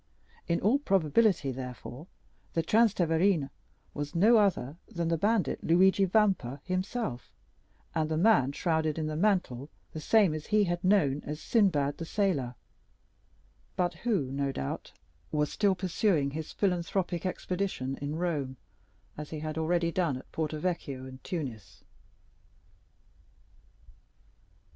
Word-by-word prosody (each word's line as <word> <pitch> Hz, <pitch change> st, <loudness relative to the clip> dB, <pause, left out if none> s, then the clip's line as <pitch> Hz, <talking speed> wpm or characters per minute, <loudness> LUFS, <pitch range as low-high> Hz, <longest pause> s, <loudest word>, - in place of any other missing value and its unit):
In 170 Hz, -, +1 dB
all 235 Hz, +8 st, +3 dB
probability, 190 Hz, -, +2 dB
therefore, 125 Hz, +3 st, -8 dB, 0.5 s
the 165 Hz, -, +1 dB
Transteverin 175 Hz, -, +2 dB, 0.4 s
was 145 Hz, +2 st, -5 dB
no 220 Hz, +7 st, +6 dB
other 175 Hz, -, +1 dB
than 170 Hz, -1 st, -2 dB
the 165 Hz, -, +2 dB
bandit 205 Hz, -6 st, +1 dB
Luigi 190 Hz, +3 st, +4 dB
Vampa 185 Hz, -, +1 dB
himself, 185 Hz, -, -3 dB, 0.6 s
and 155 Hz, -1 st, 0 dB
the 155 Hz, -, 0 dB
man 160 Hz, -, +4 dB
shrouded 160 Hz, -1 st, 0 dB
in 160 Hz, -, -1 dB
the 155 Hz, 0 st, -3 dB
mantle 160 Hz, -, 0 dB, 0.2 s
the 155 Hz, -, -6 dB
same 195 Hz, +1 st, +4 dB
he 205 Hz, +8 st, +1 dB
had 175 Hz, -1 st, -2 dB
known 155 Hz, -8 st, +3 dB
as 150 Hz, +1 st, -5 dB
"Sinbad 165 Hz, -, +2 dB
the 165 Hz, -, -4 dB
Sailor," 160 Hz, -10 st, 0 dB, 1.2 s
but 175 Hz, -1 st, 0 dB
who, 160 Hz, -, -1 dB
no 140 Hz, 0 st, -1 dB
doubt, 70 Hz, -, -5 dB, 0.4 s
was 150 Hz, -1 st, 0 dB
still 200 Hz, -3 st, +2 dB
pursuing 180 Hz, -5 st, +1 dB
his 155 Hz, +2 st, -5 dB
philanthropic 180 Hz, -2 st, -1 dB
expedition 180 Hz, -7 st, -2 dB
in 145 Hz, +1 st, -3 dB
Rome, 150 Hz, -7 st, -2 dB, 0.6 s
as 150 Hz, -, -6 dB
he 160 Hz, -, -5 dB
had 155 Hz, -1 st, -4 dB
already 170 Hz, +1 st, +1 dB
done 170 Hz, -7 st, 0 dB
at 130 Hz, -, -13 dB
Porto 155 Hz, -1 st, -2 dB
Vecchio 150 Hz, -6 st, -3 dB
and 130 Hz, 0 st, -11 dB
Tunis. 135 Hz, -, -6 dB
165 Hz, 130 wpm, -29 LUFS, 145-190 Hz, 1.2 s, no